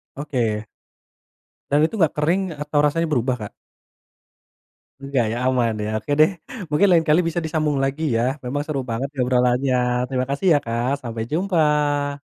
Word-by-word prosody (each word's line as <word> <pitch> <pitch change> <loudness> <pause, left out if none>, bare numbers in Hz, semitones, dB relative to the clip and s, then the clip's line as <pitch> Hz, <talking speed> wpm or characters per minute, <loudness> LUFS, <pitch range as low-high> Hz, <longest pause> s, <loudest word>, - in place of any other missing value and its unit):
Oke. 120 -7 -2 1.0
Dan 145 +2 +4
itu 200 +3 -3
nggak 155 -2 +2
kering 180 +6 +1
atau 150 0 0
rasanya 150 +3 +1
berubah, 130 -5 0
Kak? - - -19 1.5
Enggak 135 -3 0
ya, 120 - -2
aman 125 -3 +1
ya. 105 - -3
Oke 145 - -7
deh 155 - +5 0.4
mungkin 165 +7 +3
lain 165 -2 +4
kali 155 - +5
bisa 165 +1 -1
disambung 155 -2 0
lagi 135 +4 -2
ya, - - +1 0.2
memang 140 +4 -2
seru 145 -3 -2
banget 115 +4 -2 0.2
obrolannya. 125 +1 +2 0.3
Terima 130 -1 -1
kasih 140 +7 -1
ya, - - +5
Kak, 115 +2 -1
sampai 115 -1 -4
jumpa. 150 -5 +1
145 Hz, 155 wpm, -22 LUFS, 125-155 Hz, 1.5 s, deh